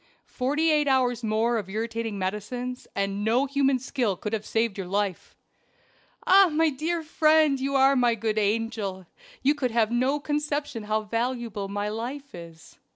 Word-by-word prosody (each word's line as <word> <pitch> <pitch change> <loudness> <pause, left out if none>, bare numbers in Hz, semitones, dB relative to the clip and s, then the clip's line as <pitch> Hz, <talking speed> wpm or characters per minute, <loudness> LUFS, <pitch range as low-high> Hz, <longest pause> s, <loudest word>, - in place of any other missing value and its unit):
Forty 295 +6 0
eight 300 -1 +2
hours 250 -3 +2
more 225 +2 +1
of 195 -3 -7
irritating 225 0 -3
medicines, 210 +6 -4
and 200 +1 -1
no 235 +5 +2
human 275 -1 +2
skill 240 -5 -2
could 210 +4 -5
have 215 -1 -3
saved 225 -2 0
your 195 -3 -5
life." 200 -1 -2 0.9
"Ah! 385 0 +7
my 315 +1 +2
dear 320 +4 -2
friend, 310 -2 +3
you 275 +1 -2
are 270 +1 +5
my 240 -2 +3
good 220 -1 -1
angel 210 -3 -1 0.4
you 280 +2 +4
can 275 -4 -1
have 225 -1 +2
no 260 +4 +1
conception 290 -5 -3
how 215 +1 0
valuable 230 -2 -3
my 205 +1 -3
life 250 +6 -5
is." 165 -2 -12
235 Hz, 160 wpm, -26 LUFS, 210-275 Hz, 0.9 s, Ah